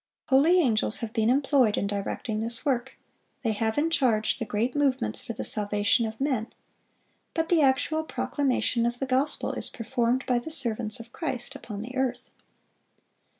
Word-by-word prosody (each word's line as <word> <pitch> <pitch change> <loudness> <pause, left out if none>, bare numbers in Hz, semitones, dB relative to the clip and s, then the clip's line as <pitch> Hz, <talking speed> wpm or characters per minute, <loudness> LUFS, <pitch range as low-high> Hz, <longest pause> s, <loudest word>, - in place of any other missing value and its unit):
Holy 310 +7 +5
angels 225 -8 +2
have 230 -2 -5
been 225 -1 +2
employed 265 -4 +3
in - - 0
directing 205 +2 -3
this 230 +1 -2
work, 265 -2 -1 0.5
they 225 - +1
have 220 +1 -1
in 320 +3 +1
charge 240 -8 +2
the 230 - -2
great 225 +5 -1
movements 265 - +1
for 230 - -5
the - - -5
salvation 210 +2 +1
of 220 0 -8
men; 260 -5 -1 0.8
but 325 0 0
the 340 -3 +4
actual 285 +3 +2
proclamation 260 -6 0
of 240 0 -2
the 270 - -2
gospel 265 +3 0
is - - -3
performed 245 +1 -1
by 245 -1 +1
the 240 - -7
servants 235 -6 +2
of 230 +1 -12
Christ 275 -5 -4
upon 215 -7 -7
the 255 +3 -8
earth. 260 -2 -2
245 Hz, 170 wpm, -27 LUFS, 220-275 Hz, 0.8 s, Holy